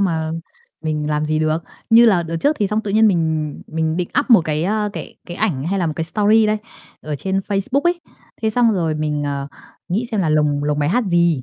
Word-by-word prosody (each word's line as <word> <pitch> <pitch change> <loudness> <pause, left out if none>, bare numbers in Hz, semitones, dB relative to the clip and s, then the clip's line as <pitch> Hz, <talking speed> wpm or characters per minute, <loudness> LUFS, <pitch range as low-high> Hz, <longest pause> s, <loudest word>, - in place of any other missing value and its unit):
mà 160 -4 0 0.5
mình 150 -1 -2
làm 150 0 0
gì 155 0 0
được. 155 0 +1 0.3
Như 230 +1 +7
là 190 -6 +4
đợt 165 0 -4
trước 290 - +1
thì 205 - +2
xong 210 +2 0
tự 210 - -5
nhiên 220 +2 +4
mình 160 -5 0
mình 160 0 -1
định 180 -1 -2
up 285 - -7
một 225 -5 +8
cái, 155 +1 -1
a, 210 +1 0
cái - - -8
cái 175 - -7
ảnh 160 -12 -1
hay 195 +3 -1
là 175 - 0
một 155 - -1
cái 165 - -1
story 215 +5 +3
đây, 215 0 +1 0.4
ở 150 -1 -4
trên 190 +6 -1
Facebook 200 +7 0
ấy. 345 +2 0 0.4
Thế 220 - +2
xong 235 0 +3
rồi 165 -5 0
mình, 150 -1 -2
ờ, 140 -1 -3 0.4
nghĩ 215 +7 -1
xem 215 -4 0
là 165 - +1
lồng 150 -1 +1
lồng 150 0 0
bài 145 - +1
hát 240 +7 +1
gì. 170 -6 +2
170 Hz, 240 wpm, -19 LUFS, 155-210 Hz, 0.5 s, một